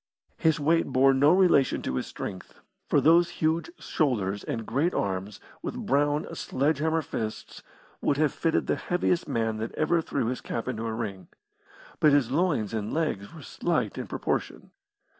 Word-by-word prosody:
His 160 -2 +2
weight 165 +3 +2
bore 135 0 +4
no 140 +3 +5
relation 180 -7 +4
to - - -2
his 65 - -2
strength, 95 -1 -7 0.3
for - - +3
those 170 +2 +5
huge 160 - 0
shoulders 105 -9 -1
and 115 -2 -4
great 160 +10 0
arms, 95 +1 -2 0.2
with - - -5
brown, 145 +2 +2
sledge 140 +2 0
hammer 160 +1 +1
fists, 110 -4 -5 0.4
would 140 - +1
have 155 -1 +2
fitted 165 -1 0
the - - 0
heaviest 175 -1 0
man 115 -4 -1
that 110 +1 -5
ever 165 +2 +2
threw 140 -5 -2
his 125 +2 -2
cap 115 - -4
into 115 +1 -3
a - - -2
ring. 100 -6 -5 0.7
But 150 -2 +5
his 135 -4 +3
loins 145 - +1
and 110 -1 -3
legs 150 -12 -2
were 155 - -10
slight 125 - -1
in - - -5
proportion. - - -3
140 Hz, 170 wpm, -27 LUFS, 110-160 Hz, 0.7 s, no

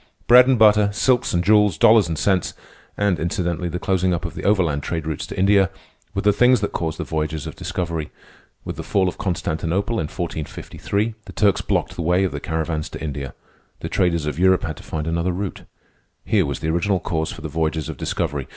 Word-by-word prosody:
Bread 125 +1 +8
and 130 -2 +4
butter, 105 -2 +5
silks 125 +4 +1
and 85 0 +1
jewels, 105 -3 +4
dollars 110 0 +6
and 80 -2 -3
cents, 95 +1 0 0.4
and, 100 -5 +1
incidentally, 85 +1 -2
the 85 - -3
closing 95 -1 +1
up 85 - -5
of - - -4
the - - -7
overland 90 -8 +2
trade 80 +1 -3
routes 80 -2 -4
to - - -8
India, 95 0 +4 0.5
were - - -1
the 105 0 +4
things 125 +2 +4
that 105 - -1
caused 80 -2 -3
the - - -3
voyages 80 -1 -3
of 80 - -7
discovery. 85 -4 -3 0.6
With - - -5
the - - -5
fall 95 -2 +1
of 90 - -4
Constantinople, 90 +3 -1
in - - -1
1453, 90 +6 -3
the 95 - -10
Turks 100 0 +2
blocked - - -1
the - - -4
way 90 +3 +2
of 95 - 0
the - - -4
caravans 80 -1 -3
to - - -8
India. 70 -3 -5 0.5
The - - -4
traders 85 -4 +1
of 75 +1 -3
Europe 95 0 +4
had 80 -1 -4
to - - -12
find 75 -1 -4
another 85 +2 -1
route. 95 +1 -5 0.6
Here 100 -8 +2
was 70 +2 -4
the 80 - -1
original 90 +4 +1
cause 80 -2 -2
for - - -9
the 80 - -4
voyages 80 0 -2
of 80 -4 -6
discovery. 70 +1 -2
85 Hz, 215 wpm, -22 LUFS, 80-100 Hz, 0.6 s, Bread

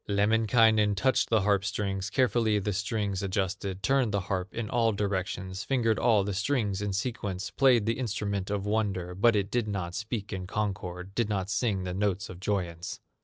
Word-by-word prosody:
Lemminkainen 110 0 +3
touched 130 +6 +2
the 110 -3 +3
harp 100 -1 +2
strings, 100 -1 -2
Carefully 115 -3 +2
the 105 0 -1
strings 100 -1 -1
adjusted, 95 0 -2
Turned 135 -5 +2
the 100 -1 0
harp 95 0 -3
in 115 -2 -4
all 115 -1 +2
directions, 95 -1 -2
Fingered 115 -3 +1
all 110 -5 +4
the 100 +1 -2
strings 100 -1 0
in 105 -1 -1
sequence, 100 -2 -3
Played 125 -5 +4
the 115 +4 0
instrument 100 -5 -2
of 100 -1 -2
wonder, 100 -4 -1
But 110 +5 +4
it 100 -1 0
did 120 -3 0
not 95 -4 -3
speak 105 0 -4
in 95 -1 -4
concord, 95 -3 -3
Did 115 0 0
not 95 -2 -1
sing 100 -6 0
the 90 -1 -3
notes 100 0 -1
of 90 - -10
joyance. 90 -4 -3
100 Hz, 180 wpm, -28 LUFS, 95-110 Hz, -, all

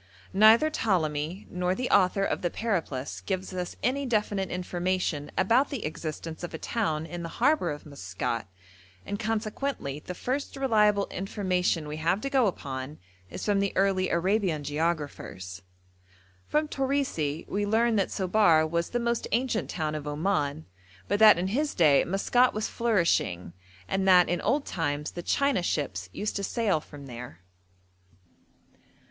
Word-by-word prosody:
Neither 220 +9 +6
Ptolemy 170 - -1
nor 180 +1 0
the 250 +3 -2
author 185 +2 +4
of - - -1
the 175 - 0
'Periplus' 165 - -3
gives 190 -1 -3
us 180 -1 -4
any 270 +4 0
definite 210 -4 0
information 180 -4 -2
about 230 +9 +3
the 270 -6 -4
existence 160 +1 -5
of 175 - -5
a - - -3
town 160 -7 -1
in 170 +2 -6
the 165 - -5
harbour 295 +6 +3
of 150 0 -6
Maskat, 115 -5 -4 0.6
and 205 - -4
consequently 215 - -2
the 180 +4 -7
first 270 +10 -3
reliable 210 -6 +3
information 185 -4 -1
we 150 +1 -5
have 170 +5 +1
to 275 - -3
go 260 -5 +4
upon 135 -5 -5 0.3
is - - -6
from 205 -2 +2
the 200 0 0
early 190 -1 +2
Arabian 180 -3 +1
geographers. 145 - -3 0.9
From 305 +1 +1
Torisi 265 - -1
we 205 +1 -1
learn 225 +2 +3
that 195 - +1
Sobar 185 -5 +3
was 170 +1 -1
the 240 - -1
most 235 -1 -1
ancient 235 -1 0
town 155 -3 -2
of 150 -1 -5
Oman; 150 -1 -1 0.4
but 205 - 0
that 215 -4 +8
in 180 +2 -1
his 290 +8 -1
day 150 -5 +5
Maskat 245 +7 +2
was 215 - -1
flourishing, 170 - 0 0.3
and 190 - 0
that 180 -2 +6
'in 175 - 0
old 285 +1 +1
times 150 -3 -2
the 175 - -6
China 280 +2 +1
ships 95 - -2
used 210 - -3
to 200 - -3
sail 205 -5 +1
from 145 -2 -12
there.' 120 -8 -9
185 Hz, 155 wpm, -28 LUFS, 155-220 Hz, 0.9 s, that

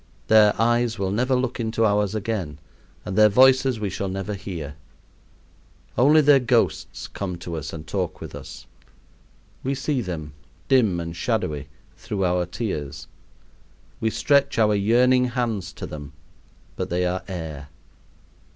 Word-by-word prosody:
Their 105 -1 +6
eyes 120 0 +2
will 95 -1 -1
never 125 +5 +1
look 125 0 -1
into 115 0 0
ours 105 -1 +1
again 105 -8 -3 0.5
and 95 - -4
their 110 +1 +6
voices 130 +1 +5
we 105 -2 -2
shall 100 +1 -3
never 95 +2 -4
hear. 90 -7 -6 1.2
Only 150 +5 +5
their 145 -1 +6
ghosts 120 -8 0
come 90 -3 -5
to 85 -1 -6
us 80 -4 -5
and 80 -1 -8
talk 90 0 -3
with - - -8
us. - - -9 1.0
We 135 +1 -1
see 135 -1 -1
them, 80 -7 -5 0.3
dim 110 -10 +3
and 85 0 -5
shadowy, 85 - -2 0.3
through 100 -2 -3
our 90 -1 +1
tears. 90 - -4 0.9
We 110 - +1
stretch 140 +4 +2
our 105 -2 +4
yearning 125 +5 +4
hands 120 -6 -2
to - - -7
them, 75 -2 -8 0.6
but - - -3
they 90 +1 0
are 90 +1 -1
air. 80 -6 -6
105 Hz, 145 wpm, -24 LUFS, 90-120 Hz, 1.2 s, Their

